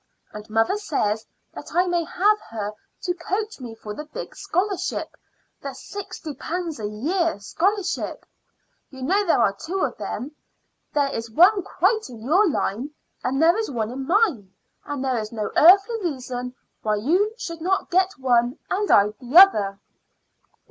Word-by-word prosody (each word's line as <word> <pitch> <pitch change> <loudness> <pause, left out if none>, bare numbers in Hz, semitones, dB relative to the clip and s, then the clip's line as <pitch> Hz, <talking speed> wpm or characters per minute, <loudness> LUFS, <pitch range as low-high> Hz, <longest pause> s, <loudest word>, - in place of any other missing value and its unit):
And 210 +1 -9
mother 225 - +2
says 225 - -1 0.3
that - - -9
I 355 +1 +4
may 350 -2 0
have 400 +5 +2
her 210 -2 -4 0.3
to 355 - 0
coach 395 +4 -3
me 240 -3 -8
for 210 -2 -8
the 300 - -7
big 300 - -8
scholarship 390 0 -2 0.5
the 275 -2 -6
sixty 380 -3 -7
pounds 330 +1 -4
a 210 - -2
year 320 - -1
scholarship. 385 - -1 0.6
You 265 -1 -9
know 390 +9 +2
there 340 - +2
are 200 -3 +2
two 370 - -4
of - - -1
them. 270 +5 -5 0.6
There 285 -2 +1
is 230 0 -4
one 365 - +5
quite 420 - 0
in 235 -3 -10
your 365 - +4
line, 250 -1 -2 0.3
and 265 +2 0
there 330 +3 +5
is 445 0 -2
one 230 -4 -2
in 265 +1 -5
mine; 335 - +2 0.3
and 285 -2 -4
there 255 -3 +1
is 215 -1 -5
no 215 -3 -3
earthly 395 +7 +6
reason 255 -6 -4 0.3
why 215 -1 +1
you 360 - +1
should 335 -7 -6
not 380 +3 0
get 370 -1 +2
one 245 0 +2
and 405 +2 0
I 205 +1 +6
the 255 +5 0
other." 205 - +7
305 Hz, 165 wpm, -23 LUFS, 235-380 Hz, 0.6 s, other